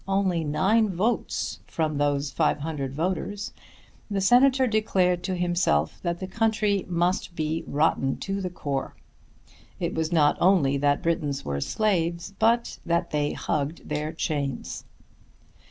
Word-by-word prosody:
only 195 Hz, -4 st, +1 dB
nine 200 Hz, +9 st, +2 dB
votes 200 Hz, +6 st, -1 dB
from 155 Hz, -3 st, -1 dB
those 145 Hz, 0 st, +1 dB
500 145 Hz, -2 st, -1 dB
voters, 185 Hz, +6 st, -3 dB, 0.6 s
the 200 Hz, -1 st, -1 dB
Senator 255 Hz, +6 st, +5 dB
declared 190 Hz, -6 st, +1 dB
to 185 Hz, 0 st, -2 dB
himself 175 Hz, -, +1 dB
that 170 Hz, -1 st, -2 dB
the 190 Hz, -, -4 dB
country 210 Hz, 0 st, +1 dB
must 175 Hz, 0 st, 0 dB
be 160 Hz, 0 st, -2 dB
rotten 140 Hz, -2 st, +1 dB
to 195 Hz, 0 st, -3 dB
the 185 Hz, -, -2 dB
core. 140 Hz, -6 st, -4 dB, 0.8 s
It -, -, -2 dB
was 160 Hz, +1 st, -1 dB
not 150 Hz, -3 st, +4 dB
only 170 Hz, -7 st, +4 dB
that 145 Hz, 0 st, +1 dB
Britons 150 Hz, -4 st, -1 dB
were 70 Hz, -1 st, -2 dB
slaves, 170 Hz, -, 0 dB
but 235 Hz, +2 st, +2 dB
that 170 Hz, +1 st, 0 dB
they 145 Hz, -1 st, 0 dB
"hugged 150 Hz, +2 st, -3 dB
their 150 Hz, +1 st, -2 dB
chains." 145 Hz, -5 st, -3 dB
170 Hz, 135 wpm, -26 LUFS, 150-195 Hz, 0.8 s, Senator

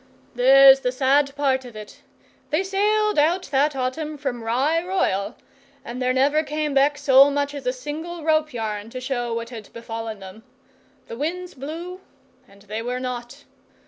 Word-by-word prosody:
'There's 270 Hz, +2 st, +7 dB
the 250 Hz, -2 st, -1 dB
sad 275 Hz, +2 st, +2 dB
part 270 Hz, -2 st, +1 dB
of 245 Hz, -3 st, -12 dB
it. 215 Hz, -1 st, -11 dB, 0.5 s
They 310 Hz, +5 st, +1 dB
sailed 420 Hz, 0 st, +1 dB
out 340 Hz, +5 st, +2 dB
that 285 Hz, +1 st, +2 dB
autumn 295 Hz, +4 st, -3 dB
from 270 Hz, -4 st, -4 dB
Rye 275 Hz, +9 st, +1 dB
Royal, 220 Hz, -, -1 dB, 0.5 s
and 245 Hz, +2 st, -6 dB
there 255 Hz, 0 st, +1 dB
never 280 Hz, +4 st, +2 dB
came 300 Hz, -1 st, -3 dB
back 280 Hz, +1 st, +3 dB
so 275 Hz, -1 st, +6 dB
much 285 Hz, 0 st, -1 dB
as 280 Hz, -3 st, -7 dB
a -, -, +3 dB
single 310 Hz, +6 st, -7 dB
rope 310 Hz, -1 st, +1 dB
yarn 215 Hz, -3 st, -4 dB
to 255 Hz, -, -7 dB
show 250 Hz, -2 st, -3 dB
what 230 Hz, +1 st, -4 dB
had 220 Hz, -4 st, -10 dB
befallen 225 Hz, -1 st, -6 dB
them. 190 Hz, +3 st, -11 dB, 0.6 s
The 230 Hz, -, -8 dB
winds 355 Hz, +6 st, -4 dB
blew, 335 Hz, +7 st, -7 dB, 0.5 s
and 200 Hz, 0 st, -20 dB
they 215 Hz, +2 st, -5 dB
were 250 Hz, +2 st, -3 dB
not. 250 Hz, +2 st, -6 dB
270 Hz, 170 wpm, -23 LUFS, 240-305 Hz, 0.6 s, There's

